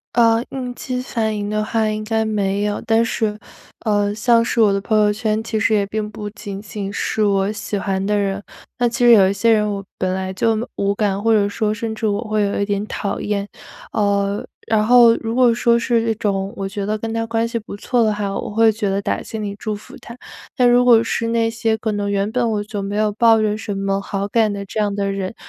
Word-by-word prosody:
呃， 230 0 +4
应 250 -2 -5
激 250 0 -4
反 220 -4 -2
应 205 0 -3
的 215 0 0
话 220 0 0
应 215 0 -2
该 220 0 0
没 205 -2 -1
有， 210 0 -2
但 225 +1 +2
是， 215 -2 -2 0.5
呃， 205 -1 +1
像 230 +1 +3
是 230 - -2
我 210 -3 +5
的 195 - -1
朋 215 +1 +1
友 210 -1 +3
圈 215 0 -1
其 220 -1 -2
实 220 - +2
也 200 -1 +2
并 210 +1 -3
不 210 0 -7
仅 200 -2 -7
仅 205 -1 -6
是 215 +1 -1
我 200 -1 +2
喜 210 -1 -4
欢 195 -1 -2
的 210 +1 +1
人， 200 0 -1 0.4
那 240 -1 +3
其 240 +1 0
实 240 - +8
有 195 -4 +7
一 195 - 0
些 230 +4 +2
人 210 -1 +2
我 195 -1 -5
本 185 0 0
来 190 0 -3
就 225 +3 +1
木 230 +3 -3
无 200 0 0
感， 200 -1 0
或 225 - +3
者 205 -2 +3
说 210 +1 -1
甚 220 +1 -3
至 220 0 -2
我 205 +1 0
会 215 0 0
有 200 0 0
一 200 - +1
点 205 0 -2
讨 200 - -3
厌。 205 -1 -2 0.5
呃， 200 -1 0 0.2
然 215 -1 +2
后 235 -1 +7
如 225 0 -4
果 250 -2 +5
说 235 0 +3
是 235 -1 +1
这 225 -1 +1
种 195 -2 -2
我 195 - -3
觉 200 0 -4
得 215 - 0
跟 225 +1 -4
他 225 0 -1
关 230 0 0
系 230 0 -3
不 210 - -9
错 240 +2 +1
的 215 - +2
话， 205 -1 -2
我 - - -4
会 225 +1 +4
觉 210 -2 -2
得 195 +1 0
打 - - -2
心 220 -1 -6
里 200 -1 -4
祝 215 -1 -3
福 255 +6 -12
他。 235 -2 -11 0.4
但 250 -3 +4
如 245 +1 +5
果 235 -2 +6
是 230 0 -2
那 230 0 +1
些 225 -1 -1
可 220 0 -2
能 205 -1 -2
原 200 0 0
本 240 -1 0
我 210 -1 -1
就 205 -1 -5
没 200 +1 -4
有 215 0 +1
抱 225 +1 +5
着 210 -1 +1
什 210 -2 -5
么 195 0 -1
好 200 0 -3
感 220 0 +2
的 200 -1 -5
这 215 - -5
样 205 -1 0
的 200 -1 -1
人， 195 +1 -4
215 Hz, 270 characters per minute, -20 LUFS, 200-225 Hz, 0.5 s, 实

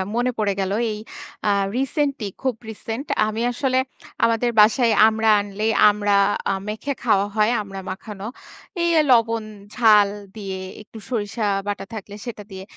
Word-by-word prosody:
মনে 245 +1 +1
পড়ে 205 -2 +1
গেল 190 0 -1 0.2
এই 210 - -5 0.5
আ - - +4 0.3
রিসেন্টলি 275 -3 -1
খুব 260 -3 0
রিসেন্ট 225 +4 -5 0.2
আমি 215 +1 -3
আসলে 260 +1 0 0.5
আমাদের 230 +1 +1
বাসায় 225 +3 +5 0.2
আমড়া 220 0 +2
আনলেই 205 +2 -1 0.2
আমড়া 205 -1 +2 0.3
আ - - +1
মেখে 220 +7 -3
খাওয়া 205 -4 +3
হয় 215 +1 +3
আমড়া 195 -1 -8
মাখানো। 195 +1 -8 0.6
এই 340 - +2 0.2
লবণ 230 -2 +3 0.3
ঝাল 210 -4 +5 0.3
দিয়ে 195 -3 -5 0.2
একটু 215 +1 -14
সরিষা 220 -2 -2 0.2
বাটা 205 -1 -3
থাকলে 205 -2 -7
সেটা 220 -4 -6
দিয়ে। 190 0 -8
220 Hz, 145 wpm, -22 LUFS, 205-235 Hz, 0.6 s, বাসায়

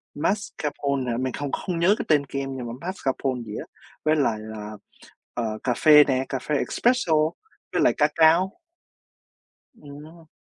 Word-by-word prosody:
mascarpone 145 - -2
hả? 115 - -1
Mình 130 0 -2
không 145 -1 -4
không 175 -3 -3
nhớ 190 +5 +4
cái - - -4
tên 145 -2 +3
kem, 135 -1 -4
nhưng 120 -2 -5
mà 115 - -6
mascarpone 135 -8 -2
gì 105 0 -7
á, - - -7 0.4
với 155 +1 +4
lại 135 -7 +1
là, 110 -1 -8 0.6
ờ, 110 -3 -3
cà 125 - +1
phê 150 +3 +7
nè, 130 -2 0
cà 135 - -2
phê 150 +3 -2
espresso, 240 - +1 0.6
với - - 0
lại - - +4
ca - - +4
cao. 170 - +4 1.2
Ừm. 155 0 -13
145 Hz, 165 wpm, -24 LUFS, 125-160 Hz, 1.2 s, phê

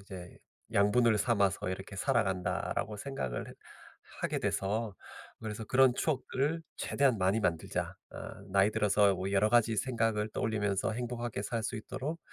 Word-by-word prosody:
이제 95 -3 -10 0.3
양분을 105 +2 +4
삼아서 100 -5 +2
이렇게 95 +2 -5
살아간다.'라고 95 0 0
생각을 100 - -4
해 - - -9 0.7
하게 - - 0
돼서 105 +1 -1 0.5
그래서 110 0 -4
'그런 130 +1 +5
추억들을 150 +2 0
최대한 135 -5 +2
많이 95 +3 +2
만들자. 85 -5 -1 0.2
어 - - -6 0.3
나이 100 +2 +4
들어서 105 -1 +3
뭐 95 +1 -3
여러 105 +2 +3
가지 115 -2 +4
생각을 115 -2 0
떠올리면서 105 -2 0
행복하게 120 -2 -3
살 115 +1 -2
수 125 - -2
있도록 140 +8 -4
105 Hz, 340 characters per minute, -32 LUFS, 100-120 Hz, 0.7 s, 그런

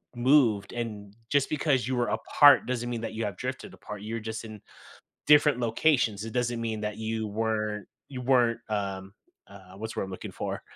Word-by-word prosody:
moved, 120 -6 +3
and 105 -4 -5 0.2
just 140 -2 +2
because 140 -5 +1
you 130 - -1
were 120 -1 +1
apart 145 -3 +5
doesn't 120 -1 -2
mean 115 -2 -3
that 115 - -5
you 110 +1 -3
have 100 -3 -4
drifted 130 +1 -5
apart, 105 -1 -9
you're 115 +2 -4
just 110 +1 -6
in 110 -2 -10 0.7
different 145 -3 +5
locations, 115 -3 +1
it 115 - -6
doesn't 120 -1 -1
mean 110 -2 -3
that 105 0 -3
you 110 0 -2
weren't 105 -1 -2 0.2
you 130 -3 -7
weren't 120 -3 +3
um, 100 -2 -3 0.4
uh, 95 -2 -14
what's 110 +2 -6
the - - -2
word - - -1
I'm 95 - -8
looking 95 - -7
for? - - -4
115 Hz, 195 wpm, -28 LUFS, 105-125 Hz, 0.7 s, apart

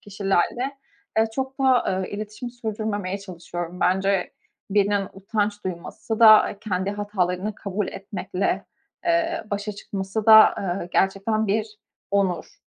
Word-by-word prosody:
kişilerle, 205 +6 -1 0.4
eee, 225 - +4
çok 265 0 -3
da, 250 -8 +3
eee, - - -8
iletişimi 215 +4 -6
sürdürmemeye 215 -4 -3
çalışıyorum. 175 -2 -7
Bence 190 0 +1 0.4
birinin 200 -1 +2
utanç 205 +1 -2
duyması 185 +5 -5
da 215 -2 +7
kendi 190 -2 -2
hatalarını 205 -1 -2
kabul 200 0 -3
etmekle, 195 0 -3 0.4
eee, 335 0 +1
başa 205 +1 -2
çıkması 200 +1 -4
da, 220 -1 +9 0.3
eee, 175 - -6
gerçekten 200 +3 +1
bir 210 +1 -1 0.3
onur. 200 - -1
205 Hz, 120 wpm, -24 LUFS, 190-220 Hz, 0.4 s, da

